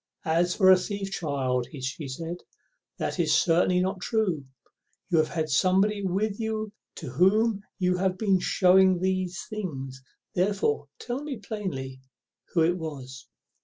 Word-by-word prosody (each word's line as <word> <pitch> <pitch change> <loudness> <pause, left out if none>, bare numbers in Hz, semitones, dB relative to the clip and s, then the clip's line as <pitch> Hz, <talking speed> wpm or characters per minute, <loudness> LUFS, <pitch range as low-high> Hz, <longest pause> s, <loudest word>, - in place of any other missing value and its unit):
"As 170 +2 +2
for 190 -2 +6
a 185 - +8
thief, 195 +1 -4
child," 130 -8 -1
says 135 -5 -6
she, 135 +2 -5 0.9
"that - - -3
is - - +3
certainly 180 +1 +3
not 185 +1 -1
true; 185 -11 0 0.7
you 165 - +4
have 155 - +3
had 160 -2 -2
somebody 190 +7 +2
with 200 +3 -1
you 220 -1 -2 0.2
to 155 - -7
whom 200 - +3 0.2
you 180 -1 +1
have 185 0 0
been 195 -3 +2
shewing 185 0 +4
the 185 0 0 0.2
things; 135 -11 -5 0.3
therefore 180 -6 0
tell 245 +3 -4
me 295 -4 -5
plainly 180 -12 -5 0.5
who 165 - +5
it 175 +2 +1
was." 135 -5 -7
185 Hz, 145 wpm, -27 LUFS, 155-200 Hz, 0.9 s, a